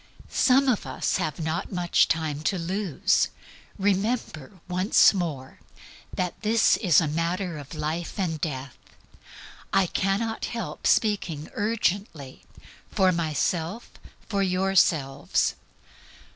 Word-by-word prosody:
Some 270 +1 +3
of 245 -5 +1
us - - -1
have 155 0 -3
not 160 +1 -3
much 180 -2 +2
time 155 -2 -1
to 195 - +1
lose. 180 -1 +1 0.5
Remember, 195 - -1
once 185 +5 +4
more, 155 -9 -4 0.5
that 180 -1 -3
this 225 +1 +4
is 180 -8 +4
a 165 - 0
matter 170 +2 -2
of 145 +3 -10
life 155 +3 -3
or 190 -4 0
death. 135 -3 -5 0.9
I 195 - +3
cannot 195 +5 -1
help 210 -11 -4
speaking 175 -8 +1
urgently, 200 -9 -2 0.5
for 190 -1 +3
myself, 170 - -2 0.4
for 200 -3 -1
yourselves. 180 -7 +1
180 Hz, 110 wpm, -26 LUFS, 155-200 Hz, 0.9 s, once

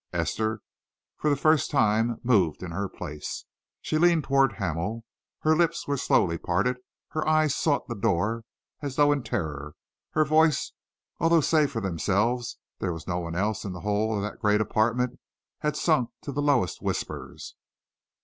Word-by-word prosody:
Esther 110 -1 -1 0.5
for 150 - 0
the 145 - +3
first 155 +2 +3
time 115 -3 +2
moved 95 -10 +2
in 90 - -5
her 100 +3 -3
place. 75 -5 -6 0.4
She 155 - 0
leaned 170 -2 +4
towards 135 -5 +3
Hamel. 100 +6 -3 0.4
Her 155 0 +4
lips 170 0 +1
were 145 - +1
slowly 85 - +2
parted, 105 +9 0 0.3
her 155 0 -2
eyes 155 -2 +3
sought 145 -3 +1
the 120 - -3
door 110 +1 0 0.4
as 140 -3 -4
though 145 0 +5
in 145 -1 +1
terror. 75 - -4 0.4
Her 155 0 +3
voice, 155 0 +3 0.5
although 165 +1 +4
save 155 -1 +3
for 115 -5 -4
themselves 105 +6 0 0.2
there 90 - -1
was 80 -2 -9
no 90 0 -1
one 85 -1 -5
else 105 +3 -1
in 95 - -4
the 90 - -8
whole 105 +2 0
of 100 - -1
that 105 - -5
great 105 -1 +3
apartment, 120 +3 0 0.4
had 150 -1 -1
sunk 130 -8 +2
to 140 - -4
the 140 +2 -2
lowest 140 - +2
of - - -11
whispers. - - -4
115 Hz, 170 wpm, -27 LUFS, 100-145 Hz, 0.5 s, though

